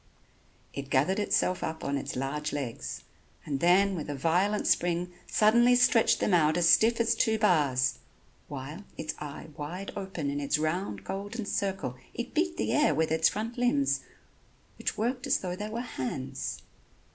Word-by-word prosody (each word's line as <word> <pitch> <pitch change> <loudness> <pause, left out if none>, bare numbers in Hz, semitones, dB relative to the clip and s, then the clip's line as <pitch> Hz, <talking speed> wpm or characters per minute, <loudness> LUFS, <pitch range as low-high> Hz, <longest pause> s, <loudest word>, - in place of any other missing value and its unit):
It 140 -1 -6
gathered 160 +10 +2
itself 185 -3 +1
up 160 0 -4
on 140 - -1
its 140 - -4
large 140 +4 -2
legs 135 -6 -5 0.4
and 140 -2 -2
then 190 +5 +4
with 155 -5 -5
a 145 - -2
violent 180 +9 +1
spring 175 0 +1 0.2
suddenly 235 +3 +5
stretched 230 -2 +4
them 205 - +1
out 155 -1 +4
as 175 -1 +3
stiff 230 +6 +5
as 230 0 +3
two 220 -1 +2
bars; 145 - +2 0.5
while, 145 +7 -7
its 155 - -3
eye 150 +1 -7
wide 175 +7 -6
open 185 -8 -3
in 145 - -2
its 145 +1 +1
round, 155 +5 -2
golden 205 +3 -5
circle, 195 -11 -2 0.2
it 240 - -5
beat 340 +2 0
the - - -1
air 300 0 +3
with 160 0 +1
its 160 0 +4
front 230 +3 -4
limbs 275 +3 +2 0.8
which - - -2
worked 250 +3 -1
as - - +3
though 180 -1 -4
they 210 +3 -5
were 230 +2 -3
hands. 135 - -5
180 Hz, 170 wpm, -29 LUFS, 150-220 Hz, 0.8 s, suddenly